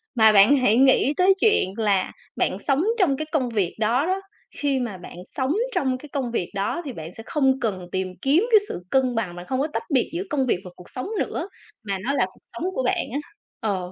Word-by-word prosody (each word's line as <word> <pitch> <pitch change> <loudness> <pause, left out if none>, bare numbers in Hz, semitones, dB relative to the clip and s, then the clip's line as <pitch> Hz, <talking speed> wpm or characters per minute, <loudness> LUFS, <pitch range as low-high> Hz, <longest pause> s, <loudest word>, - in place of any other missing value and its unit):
mà 220 -2 +7
bạn 210 +8 +6
hãy 235 -3 +3
nghĩ 270 +2 +5
tới 370 +1 +6
chuyện 420 - +3
là 205 -4 +1 0.2
bạn - - 0
sống 275 +3 +3 0.2
trong 280 -8 +3
cái 310 - -3
công 260 -6 +1
việc 200 -6 -1
đó 235 +6 +2
đó. 375 +2 0 0.4
Khi 280 -2 +1
mà 230 -6 -3
bạn 180 - -11 0.2
sống 265 +2 0 0.2
trong 260 -2 +1
cái 295 +3 -12
công 260 -4 -2
việc 180 -7 -2
đó, 200 - -1
thì 270 - -5
bạn 165 -2 -8
sẽ 225 - -8
không 270 -3 +2
cần 190 -7 -2
tìm 190 0 -1
kiếm 305 +10 +3
cái 435 - +8
sự - - -4
cân 255 0 +2
bằng, 190 -6 -2
bạn 175 - -8
không 260 +6 -2
có 295 - +1
tách 300 - -4
biệt 255 - +2
giữa 345 +3 -2
công 275 -3 +1
việc 230 - +1
và 180 - -8
cuộc 180 - -14
sống 255 +9 -5
nữa, 360 +5 -2 0.3
mà 200 -2 -2
nó 270 +5 0
là - - +2
cuộc - - -24
sống 340 - -4
của 260 - -1
bạn 250 - +1
á." 285 - 0 0.4
Ờ. 190 -5 -2
255 Hz, 240 wpm, -24 LUFS, 205-285 Hz, 0.4 s, cái